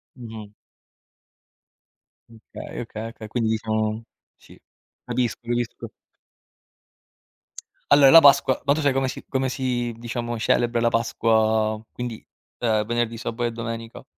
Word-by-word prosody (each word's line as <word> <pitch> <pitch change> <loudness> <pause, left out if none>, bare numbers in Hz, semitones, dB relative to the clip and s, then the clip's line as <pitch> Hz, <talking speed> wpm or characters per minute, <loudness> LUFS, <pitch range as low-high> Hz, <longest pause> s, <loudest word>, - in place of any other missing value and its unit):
Mh-mh. 110 -4 -10 1.8
Okay, 115 +1 -9
okay, 115 -1 -6
okay. 110 -1 -10
Quindi 115 0 -1
diciamo 110 0 -1 0.4
sì, - - -18 0.5
capisco, 120 -1 -2
capisco. 120 0 -3 2.0
Allora 140 -2 +8
la 165 - +11
Pasqua 140 -2 +5
ma 140 - +4
tu 155 - -2
sai 140 -2 +2
come 135 0 0
si 130 - -6
come 130 -1 -1
si, 125 -3 -2
diciamo, 120 0 -4
celebra 120 +1 +1
la 120 - +3
Pasqua, 110 -1 +1
quindi, 120 -2 -6 0.3
uhm, 110 -3 +1
venerdì, 120 0 -1
sabato 120 +1 -4
e 120 - 0
domenica? 115 0 -6
115 Hz, 125 wpm, -23 LUFS, 110-125 Hz, 2.0 s, la